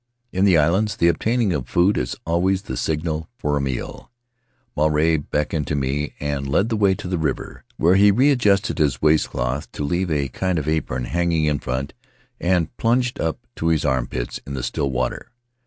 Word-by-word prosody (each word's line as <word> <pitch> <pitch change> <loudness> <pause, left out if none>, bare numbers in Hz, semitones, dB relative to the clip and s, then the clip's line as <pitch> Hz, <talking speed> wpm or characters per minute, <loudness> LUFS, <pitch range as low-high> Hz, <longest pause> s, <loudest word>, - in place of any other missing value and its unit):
In 95 +2 +2
the 95 -4 +5
islands, 95 +8 +2
the 85 - +3
obtaining 110 +2 +1
of 65 -6 -3
food 90 +4 +3
is - - -2
always 95 +4 +1
the - - -5
signal 80 0 -2
for 75 -6 -1
a 70 - 0
meal. 65 -2 -4 0.7
Maruae 75 +2 +3
beckoned 75 0 -1
to 75 - -1
me 70 +2 -2
and 70 -1 -2
led 95 +11 +1
the 115 - 0
way 100 -3 +3
to 90 - -7
the 90 -2 -1
river, 75 -4 -3
where 85 +3 +4
he 100 +2 +6
readjusted 105 -6 +3
his 70 -6 +1
waistcloth 75 -3 +1
to - - -4
leave 85 +5 -1
a 70 -3 0
kind 95 +6 -1
of 75 -2 -3
apron 75 -5 -1
hanging 85 0 0
in 75 -2 +1
front 65 +3 -3 0.5
and 90 -2 0
plunged 125 +1 +1
up 80 -1 -2
to 80 - -1
his 80 -2 +2
armpits 65 -3 -2
in 70 - -4
the 65 - -4
still 70 +3 -1
water. 65 - -2
80 Hz, 190 wpm, -22 LUFS, 70-95 Hz, 0.7 s, he